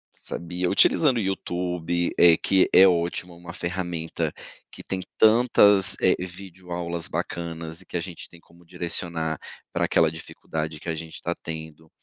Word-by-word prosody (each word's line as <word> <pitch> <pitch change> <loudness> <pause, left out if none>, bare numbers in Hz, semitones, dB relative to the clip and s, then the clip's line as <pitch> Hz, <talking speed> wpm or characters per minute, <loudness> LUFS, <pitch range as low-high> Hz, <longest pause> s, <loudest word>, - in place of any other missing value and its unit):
sabia 90 +1 -4
utilizando 130 - +4
o - - +1
YouTube, 90 -2 -2
eh, 85 -2 +7
que 95 -1 +3
é 95 - +9
ótimo, 85 0 -1
uma 85 0 -10
ferramenta 85 -2 -3 0.4
que - - -10
tem 95 -1 -3 0.2
tantas, 105 -4 +5
eh, 95 - +4
videoaulas 90 -2 -5
bacanas 85 0 -5
e - - -14
que - - -11
a - - -1
gente 85 0 -8
tem 85 - -16
como 85 +1 -22
direcionar 85 -2 -3 0.3
pra - - 0
aquela 80 -1 +3
dificuldade 80 -1 -6
que 85 - -7
a 80 - -1
gente 80 0 -8
tá 85 - -2
tendo. 80 -1 -8
85 Hz, 155 wpm, -25 LUFS, 80-95 Hz, 0.4 s, é